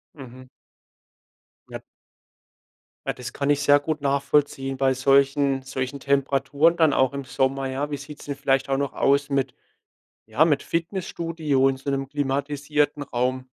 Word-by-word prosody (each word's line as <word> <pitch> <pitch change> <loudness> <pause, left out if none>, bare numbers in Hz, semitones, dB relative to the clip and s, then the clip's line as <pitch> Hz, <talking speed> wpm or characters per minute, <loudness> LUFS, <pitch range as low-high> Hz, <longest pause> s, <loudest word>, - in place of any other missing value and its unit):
Mhm. 130 -2 -12 1.2
Ja. - - -7 1.3
Ja, - - 0
das 125 0 -8
kann 140 0 -2
ich 145 0 +2
sehr 145 0 +5
gut 150 0 -3
nachvollziehen 140 -1 0
bei 135 -1 +2
solchen 135 +1 +2
solchen 130 +1 -4
Temperaturen 140 +3 +2
dann 160 -3 +4
auch 130 0 +2
im 140 0 -4
Sommer, 135 +1 -1
ja. 140 +3 -3
Wie 145 - -2
sieht's 145 +2 -11
denn 140 -1 -4
vielleicht 135 -1 +1
auch 135 - +1
noch 140 -1 -1
aus 140 +1 +2
mit 135 -2 0 0.7
ja, 110 +8 +2
mit 145 -4 +2
Fitnessstudio 165 -5 -1
in 135 - -2
so 135 - -5
'nem 135 -1 -2
klimatisierten 145 +1 -1
Raum? 130 -1 -1
140 Hz, 150 wpm, -24 LUFS, 135-145 Hz, 1.3 s, sehr